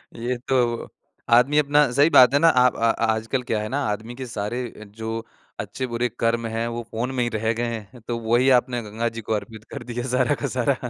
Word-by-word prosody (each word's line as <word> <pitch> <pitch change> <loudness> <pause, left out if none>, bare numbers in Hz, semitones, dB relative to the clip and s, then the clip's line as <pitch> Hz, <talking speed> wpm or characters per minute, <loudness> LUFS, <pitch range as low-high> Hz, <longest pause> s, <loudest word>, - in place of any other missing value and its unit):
ये 120 +2 -2
तो 120 -3 0 0.4
आदमी 125 +5 +5
अपना 145 -2 +3
सही 145 +5 +4
बात 130 -4 +7
है 145 - +4
ना 165 - +6
अ, 125 -3 +5
ब - - -14
अ 115 0 +2
अ, - - -3
आजकल 115 +4 -2
क्या 110 - +1
है 105 - -4
ना 140 +3 -1
आदमी 110 +3 -4
के 130 0 -6
सारे 115 +2 -3 0.2
जो 110 +2 -6 0.5
अच्छे-बुरे 125 -1 -2
कर्म 115 0 +1
हैं, 115 +1 -2
वो 120 0 -4
फ़ोन 120 +4 -2
में 125 - +1
ही 120 - 0
रह 110 0 -1
गए 120 +1 -3 0.3
हैं। 120 - -14
तो 120 -1 -2
वही 120 +4 +2
आपने 120 -1 -2
गंगा 115 +3 -2
जी - - -4
को 110 - -3
अर्पित 105 +1 -5
कर 140 -4 -6
दिया 120 0 -3
सारा 125 -1 +2
का - - -3
सारा - - +1
120 Hz, 230 wpm, -23 LUFS, 115-125 Hz, 0.5 s, बात